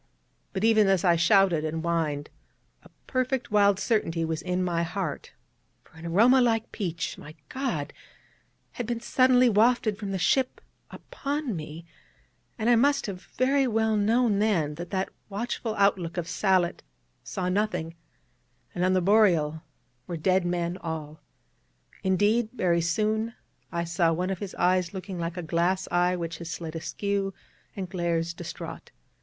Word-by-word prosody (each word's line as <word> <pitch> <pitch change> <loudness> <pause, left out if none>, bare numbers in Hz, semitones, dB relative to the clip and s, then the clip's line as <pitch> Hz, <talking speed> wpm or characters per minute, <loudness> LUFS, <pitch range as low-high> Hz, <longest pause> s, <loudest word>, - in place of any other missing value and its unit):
But 190 - -3
even 220 -2 +5
as 190 -2 +2
I 175 -2 +5
shouted 175 -1 +4
and 160 +1 -3
whined, 155 -4 -1 0.5
a - - -17 0.2
perfect 255 -2 -1
wild 200 -2 +4
certainty 185 -6 0
was 160 0 -2
in 180 +1 -1
my 170 -2 0
heart: 170 -1 -4 0.5
for - - -25
an 160 +1 -8
aroma 235 +10 +5
like 225 -2 +1
peach, 170 -6 -4
my 155 +1 -11
God, 265 0 -3 0.8
had 245 - -5
been 235 -1 -2
suddenly 255 +1 +4
wafted 220 -1 +3
from 205 -3 -4
the 195 - -1
ship 255 +9 +1 0.3
upon 290 - -4
me, 155 +1 -7 0.7
and 220 -1 -1
I 240 - +6
must 280 +4 +3
have 190 -3 -6
very 270 +1 +3
well 220 -1 +1
known 215 0 +2
then 180 -9 +1
that 170 +3 -7
that 190 0 -1 0.2
watchful 220 +1 -3
outlook 190 -4 +1
of 170 -1 -2
Sallitt 185 -3 +1 0.4
saw 180 -1 -3
nothing, 180 -4 -1 0.8
and 175 - -2
on 185 +1 +3
the 185 - +3
Boreal 170 -6 +3 0.5
were 170 - -4
dead 185 +2 +2
men 175 0 -1
all; 155 -3 -6 0.8
indeed, 205 +4 +2
very 175 -7 +1
soon 215 +7 0 0.4
I 170 -1 -1
saw 170 0 +1
one 180 +3 -1
of 190 - -3
his 200 -2 -6
eyes 180 0 +1
looking 190 -1 -6
like 170 +1 -3
a 180 - -3
glass 170 +4 0
eye 175 +1 +2
which 165 -2 -5
has 170 -1 -7
slid 165 0 -6
askew, 195 +3 -2 0.4
and 190 -2 -4
glares 170 -2 -1
distraught. - - -8
185 Hz, 155 wpm, -27 LUFS, 170-220 Hz, 0.8 s, I